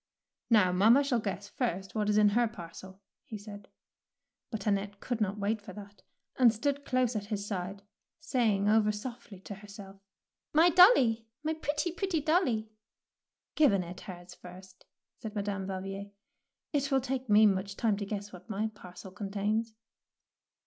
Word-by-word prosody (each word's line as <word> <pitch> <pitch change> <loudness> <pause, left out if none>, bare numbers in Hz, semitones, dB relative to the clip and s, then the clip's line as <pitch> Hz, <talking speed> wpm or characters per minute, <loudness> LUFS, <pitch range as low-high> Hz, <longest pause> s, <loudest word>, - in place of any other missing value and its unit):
Now, 210 -6 +5
mamma 220 +10 +5
shall 265 -4 +1
guess 200 -1 -4
first 195 -4 -3
what 210 -1 0
is 210 - +3
in 210 -1 +6
her 235 +3 +2
parcel,^' 190 -1 -10 0.2
he 215 - -7
said; 205 -1 -11 0.8
but 220 -5 -5
Annette 200 -1 -1
could 245 -3 -3
not 205 0 0
wait 210 +2 -1
for 195 -2 -10
that, 205 0 -12 0.4
and 245 -3 +7
stood 280 +5 -2
close 255 -2 +1
at 205 -1 -3
his 205 -2 -3
side, 195 0 -5 0.4
saying 230 -10 +1
over 210 0 +4
softly 215 -2 -8
to 200 - -8
herself, 200 -1 -12 0.2
— - - -62
" - - -62
My 335 +3 +6
dolly, 265 - +6 0.2
my 315 +1 0
pretty, 310 +2 -2
pretty 360 -1 -1
dolly." 285 - +1 0.8
Give 305 -5 +5
Annette 180 -2 -3
hers 180 -1 -10
first," 185 +1 -14 0.3
said 220 -1 -7
Madame 200 -2 -3
Valvier; 195 +1 -5 0.6
'4t 280 -1 0
will 270 -1 +3
take 260 -1 -3
me 210 +1 +7
much 195 -1 +1
time 225 -4 +2
to 205 - -4
guess 205 0 -5
what 180 +5 -13
my 215 +1 -1
parcel 185 -1 -11
contains. 210 +3 -2
210 Hz, 165 wpm, -30 LUFS, 195-240 Hz, 0.8 s, and